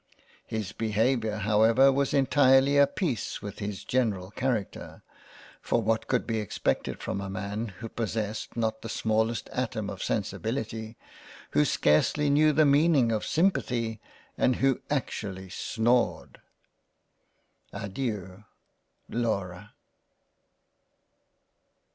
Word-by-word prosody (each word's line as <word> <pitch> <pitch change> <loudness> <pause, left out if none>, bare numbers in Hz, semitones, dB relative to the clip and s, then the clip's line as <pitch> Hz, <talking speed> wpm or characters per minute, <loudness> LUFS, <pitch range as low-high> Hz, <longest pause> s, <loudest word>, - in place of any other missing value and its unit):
His 110 -4 -4
Behaviour 110 +1 0
however 110 +6 +4
was 140 0 0
entirely 135 0 +4
of 140 -1 +6
a - - -23
peice 155 - -2
with 100 - -8
his 100 -2 -5
general 105 -7 -1
Character; 120 -4 -3 0.6
for - - +1
what 110 +1 0
could 125 - 0
be 115 -2 -1
expected 105 - -2
from 100 - -3
a 100 - -5
man 100 +4 -4
who 100 +2 -8
possessed 110 -1 -4
not 110 -1 -1
the 115 - -7
smallest 110 +1 0
atom - - -3
of - - -8
Sensibility, 110 -1 -3 0.5
who 75 - +4
scarcely 140 - +2
knew 155 +2 +5
the 155 +1 +4
meaning 145 -4 +4
of 110 -2 0
simpathy, 120 - 0 0.4
and 125 - +3
who 135 -2 +1
actually 100 -9 -3
snored 120 +5 0 0.7
—. - - -44
Adeiu 100 -2 -5 0.6
Laura. 105 -4 -3
115 Hz, 115 wpm, -28 LUFS, 105-130 Hz, 0.7 s, of